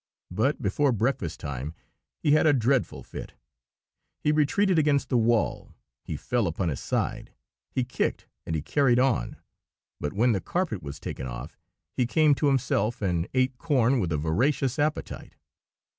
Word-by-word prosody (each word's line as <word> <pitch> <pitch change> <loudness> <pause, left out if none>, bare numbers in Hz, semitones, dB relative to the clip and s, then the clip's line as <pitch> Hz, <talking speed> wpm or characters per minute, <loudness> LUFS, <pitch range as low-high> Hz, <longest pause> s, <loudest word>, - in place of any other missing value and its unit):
But 120 +11 0
before 135 +8 +2
breakfast 115 - -1
time 70 +3 -5 0.4
he 150 - +1
had 155 +1 +5
a 150 - +6
dreadful 130 0 +1
fit. - - -9 0.8
He 150 - +1
retreated 160 +5 +3
against 145 -3 +2
the 125 - +2
wall, 115 -1 0 0.3
he - - -5
fell 120 -5 0
upon 85 +1 -1
his 70 - -3
side, - - -2 0.4
he 130 - -1
kicked, 120 - -2 0.2
and 80 - -3
he 75 - -2
"carried 135 - +3
on"; 130 -2 +1 0.6
but 75 - -3
when 120 +4 +3
the 100 -4 0
carpet 170 - -2
was 70 -2 -7
taken 65 - -5
off 60 +5 -7 0.4
he 125 - +1
came 155 +2 +4
to 145 +1 +1
himself, 120 -4 +1
and 90 -2 0
ate 130 -1 +1
corn 135 -5 +2
with 90 -6 -1
a 75 - +1
voracious 125 - 0
appetite. 150 +1 -2
125 Hz, 160 wpm, -27 LUFS, 90-140 Hz, 0.8 s, a